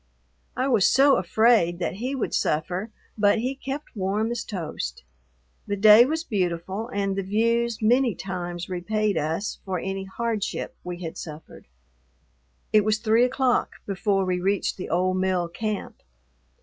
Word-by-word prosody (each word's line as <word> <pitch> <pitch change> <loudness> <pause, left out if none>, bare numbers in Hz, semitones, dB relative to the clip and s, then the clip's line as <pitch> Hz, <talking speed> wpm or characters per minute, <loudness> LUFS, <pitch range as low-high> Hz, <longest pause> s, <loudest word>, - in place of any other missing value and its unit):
I 255 - +1
was 225 -8 +4
so 275 +2 +5
afraid 185 -2 +3
that 180 +1 -3
he 255 +5 -3
would 260 - -2
suffer, 180 +7 -1 0.3
but 205 +1 +4
he 250 +4 -1
kept 275 +1 -7
warm 205 +3 -1
as 240 -1 -3
toast. 160 - -5 0.6
The 205 - -1
day 215 +3 +8
was 320 +4 -2
beautiful, 190 - -2
and 195 -2 -1
the 195 - -1
views 230 +3 0
many 240 0 +3
times 175 -2 -5
repaid 205 +3 -1
us 160 +7 -2
for 190 -1 -2
any 195 +2 -4
hardship 220 +1 -3
we 180 0 -6
had 160 - -6
suffered. 155 - -10 1.1
It 215 -1 +6
was 215 +1 +2
three 225 +2 +3
o'clock 255 -1 +1
before 195 0 0
we 180 -1 0
reached 195 +1 0
the 185 - -6
old 185 +2 +1
mill 185 -2 0
camp. 210 +4 -4
200 Hz, 150 wpm, -25 LUFS, 185-230 Hz, 1.1 s, day